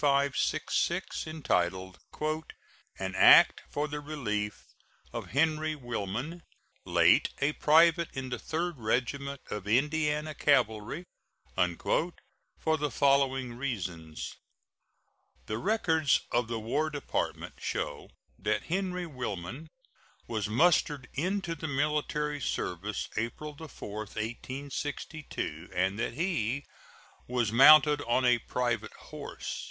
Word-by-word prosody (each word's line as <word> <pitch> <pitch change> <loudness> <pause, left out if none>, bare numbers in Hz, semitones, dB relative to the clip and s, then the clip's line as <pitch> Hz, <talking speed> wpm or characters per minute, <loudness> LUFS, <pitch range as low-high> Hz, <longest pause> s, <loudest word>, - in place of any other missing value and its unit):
2566, 140 +1 +1
entitled 95 - -1 1.0
"An 95 -1 -3
act - - +7
for 150 +1 -1
the 150 0 -4
relief 105 -9 -3 0.5
of - - -5
Henry 155 +2 +1
Willman, 120 - -4 0.5
late - - +5
a 140 +2 +2
private 165 +3 +5
in 130 -1 -4
the 125 -2 -3
Third 165 -2 -3
Regiment 135 +5 -1
of 105 -1 -4
Indiana 150 +5 +1
Cavalry," 120 +2 +1 0.5
for 160 - -1
the 150 0 0
following 135 -3 +2
reasons: 90 - -4 1.1
The 110 +1 -3
records 160 - +2
of 120 -1 +1
the 115 -1 -3
War 145 +8 0
Department 145 -2 -3
show 75 - -3 0.3
that - - 0
Henry 180 -2 -1
Willman 125 - -5 0.6
was 110 -2 -2
mustered 145 +1 +3
into 180 +3 -1
the 160 0 -5
military 150 0 0
service 100 -1 -2
April 120 +7 -3
4, 140 -9 -8
1862, 130 - -5
and 95 +3 +1
that 115 - -2
he 140 - -1 0.6
was 120 -3 0
mounted 150 +4 +8
on 125 +2 +2
a 120 -1 +5
private 115 -4 -2
horse. - - -7
140 Hz, 105 wpm, -30 LUFS, 110-155 Hz, 1.1 s, mounted